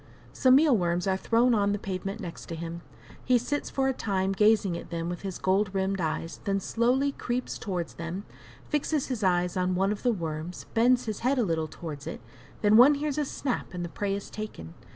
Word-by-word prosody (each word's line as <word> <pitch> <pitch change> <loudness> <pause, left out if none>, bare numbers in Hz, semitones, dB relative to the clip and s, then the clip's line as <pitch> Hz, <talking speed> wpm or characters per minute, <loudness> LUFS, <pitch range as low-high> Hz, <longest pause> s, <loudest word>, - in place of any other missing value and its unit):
Some 260 0 +5
meal 290 -2 +5
worms 175 -2 0
are 190 -1 +2
thrown 235 +5 +3
on 205 -2 +2
the - - 0
pavement 195 +1 -4
near 165 -2 -7
him. 170 +1 -6 0.4
He 250 0 +4
sits 280 +5 -2
for 270 -1 0
a 265 - +2
time 195 -5 -1
gazing 210 -2 +3
at - - -7
them 170 0 -3
with 175 - -5
his 195 -2 -4
gold 195 +2 +2
rimmed 190 0 0
eyes; 160 +1 -3
then 195 -1 +1
slowly 250 +7 +1
creeps 250 -2 -3
towards 180 -6 -3
them, 170 +4 -5 0.4
fixes 295 -1 0
his 240 -5 -2
eyes 180 -1 +2
on 185 0 +1
one 195 +2 +2
of 210 - -3
the 245 - +3
worms 165 -3 -4
bends 245 +2 +4
his 215 -3 -3
head 260 +4 +1
a 245 - +3
little 160 -3 0
towards 155 -2 -8
it, - - -5 0.4
then 210 +1 +6
one 270 +5 +8
hears 295 0 -2
a 295 - +1
snap 260 -8 -3
and 175 -1 -3
the - - -6
prey 195 +3 -2
is 200 - -7
taken. 85 - -7
195 Hz, 215 wpm, -28 LUFS, 175-245 Hz, 0.4 s, one